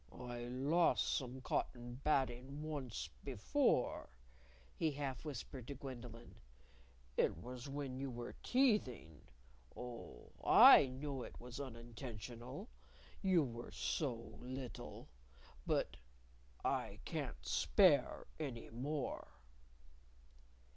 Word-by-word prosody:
"I 120 -1 -6
lost 140 +8 +3
some 130 -2 -3
cotton 120 0 -2
batting 135 0 +1
once 145 -7 -4
before," 135 - +1 0.7
he 160 - +2
half 135 -3 -3
whispered 135 -4 -6
to 140 - -4
Gwendolyn. 120 -3 -8 0.8
"It - - +3
was 125 - -7
when 135 -2 -3
you 135 0 -2
were 120 -1 -5
teething. 210 - +2 0.6
Oh, 125 -1 -8
I - - +10
know 135 +1 -4
it - - -8
was 125 +2 -7
unintentional! 120 - -7 0.5
You 185 -5 +5
were 120 -2 -5
so 140 -6 -1 0.3
little. 130 0 -6 0.6
But - - +1 0.7
I - - 0
can't - - -4
spare 145 - +4
any 130 -7 -4
more." 135 +4 -2
130 Hz, 100 wpm, -39 LUFS, 120-145 Hz, 0.8 s, I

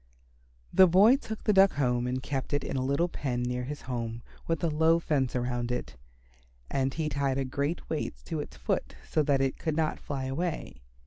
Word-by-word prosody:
The 190 - +8
boy 200 +8 +7
took 220 -6 -7
the 210 - +3
Duck 195 0 +6
home 125 -3 +1
and 130 +1 -2
kept 135 0 -3
it 145 - +1
in - - -4
a 130 - 0
little 140 +6 +1
pen 125 -7 -2
near 125 0 -2
his 145 +2 -6
home 115 -2 -4 0.2
with 165 -2 -1
a - - +3
low 160 +1 +4
fence 140 -6 0
around 120 -1 -1
it. 125 - -3 0.8
And 135 0 +1
he 155 +2 -2
tied 140 -2 0
a 135 - 0
great 140 +5 -2
weight 155 - -2
to 160 - -3
its 145 - -7
foot - - -2
so 155 - +2
that 140 -2 +2
it 135 -1 0
could 160 -2 -1
not 160 -1 0
fly 135 -2 -4
away. 135 - -3
140 Hz, 205 wpm, -29 LUFS, 130-160 Hz, 0.8 s, The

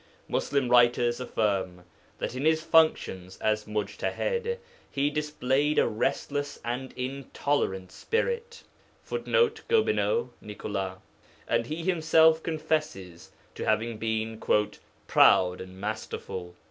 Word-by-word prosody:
Muslim 140 -3 0
writers 120 0 +4
affirm 100 -7 -1 0.3
that - - -3
in 130 +2 -4
his 160 0 +3
functions 95 - +2
of 110 0 0
mujtahād 470 - -2 0.3
he 145 +1 0
displayed 150 -1 0
a - - +4
restless 140 +5 -2
and 125 +2 -3
intolerant 125 -7 -2
spirit, 470 0 -2 0.4
[Footnote: 470 -1 +1
Gobineau; 465 +1 +2
Nicolas.] 100 -2 -4 0.5
and 115 0 +1
he 160 +4 -4
himself 160 -2 +4
confesses 150 - -3 0.2
to - - -6
having 110 +1 0
been 110 0 -2 0.6
'proud 90 -1 +5
and 95 0 -10
masterful.' 95 -4 -5
125 Hz, 105 wpm, -28 LUFS, 105-160 Hz, 0.6 s, proud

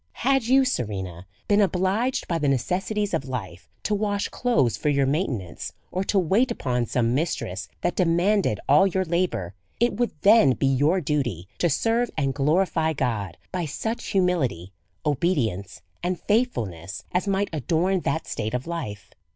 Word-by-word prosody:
Had 270 -3 +3
you, 265 +2 +5
Serena, 95 - -3 0.2
been 205 0 +4
obliged, 195 +6 +1
by 170 -2 0
the 150 - 0
necessities 190 - 0
of 140 -5 -2
life, 95 -8 -6
to 215 - 0
wash 205 -1 0
clothes 185 - +1
for 150 - -1
your 140 -1 +3
maintenance, 130 - -2 0.2
or 185 - -1
to 200 - +1
wait 195 +8 +3
upon 125 - -1
some 120 -2 +1
mistress 100 - -2
that 175 - -1
demanded 180 - +2
all 150 +8 +6
your 190 0 0
la 175 +2 +2
bour, 90 - -5 0.3
it 240 +1 +3
would 240 0 +1
then 200 - +6
be 135 - -1
your 145 +7 +3
duty 130 - -1
to 175 - +3
serve 230 - +1
and 135 -1 +1
glorify 160 +3 +1
God 105 - -2
by 180 -2 -2
such 220 +10 -4
humihty, 160 - +1 0.3
obedience, 125 - -1 0.2
and 180 0 -1
faithfulness, 105 - -1
as 180 +3 0
might 200 +1 0
adorn 170 +6 +1
that 160 -1 -2
state 110 +1 -3
of 125 - -3
life. 160 -12 -5
160 Hz, 160 wpm, -25 LUFS, 125-195 Hz, 0.3 s, all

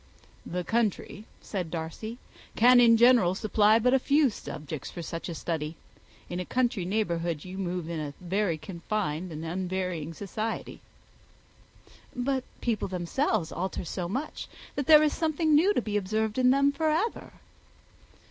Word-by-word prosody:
"The 180 +1 -3
country," 215 0 -1 0.2
said 185 -5 -4
Darcy, 170 +8 -5 0.4
"can 245 +2 +7
in 230 -1 +7
general 235 -7 +5
supply 215 +1 +4
but 250 +3 +3
few 285 -2 +3
subjects 155 -6 -7
for 170 - -7
such 165 +2 -5
a 170 - -4
study. 160 -1 -3 0.5
In 175 - -4
a - - -1
country 235 -3 0
neighbourhood 170 -5 -1
you 185 +1 -7
move 180 -3 -3
in 165 -1 -3
a 145 -2 -5
very 185 -1 0
confined 175 -1 -3
and 155 +1 -6
unvarying 180 -2 -3
society." 215 +4 -4 1.3
"But 260 +1 -1 0.2
people 230 -4 -1
themselves 180 - -1
alter 185 0 -3
so 175 +1 -4
much, 265 +10 -4 0.3
that 280 -2 -3
there 305 -1 +8
is 300 - +2
something 315 -1 +1
new 335 +7 +5
to - - +1
be 210 -1 -1
observed 215 +3 -1
in 250 0 +5
them 275 +2 +4
for 315 +2 0
ever." 360 +10 -1
200 Hz, 150 wpm, -28 LUFS, 170-245 Hz, 1.3 s, there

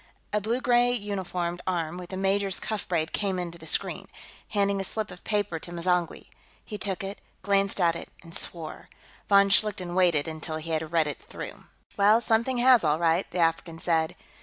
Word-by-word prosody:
A 210 - +2
blue 230 +5 -1
gray 245 0 +4
uniformed 185 -5 -3
arm, 170 -3 -1
with 180 0 -9
a 190 - -4
major's 195 0 +1
cuff 215 -2 -4
braid, 165 -3 -1
came 195 -3 -1
into 170 -1 -5
the 160 - -9
screen, - - 0 0.4
handing 200 -1 +1
a - - -2
slip 215 +1 0
of 180 - -12
paper 205 -6 -1
to 175 - -7
M'zangwe; 175 0 -1 0.4
he 210 -2 -6
took 195 -1 -2
it, 195 +1 -6 0.2
glanced 200 0 +2
at 170 -2 +3
it, - - -7
and 165 -1 -12
swore. 165 -3 -3 0.4
Von 200 0 +6
Schlichten 195 -3 +2
waited 175 -5 +3
until 160 0 -4
he 160 +1 -6
had 160 0 -2
read 165 -2 +3
it 145 -2 -5
through. - - -9 0.3
"Well, 205 +3 +6
something 235 +2 +1
has, 245 -2 +6
all 150 -1 +2
right," 170 +2 +1
the 175 - -5
African 165 0 +1
said. 165 -1 0
185 Hz, 190 wpm, -27 LUFS, 165-205 Hz, 0.4 s, Von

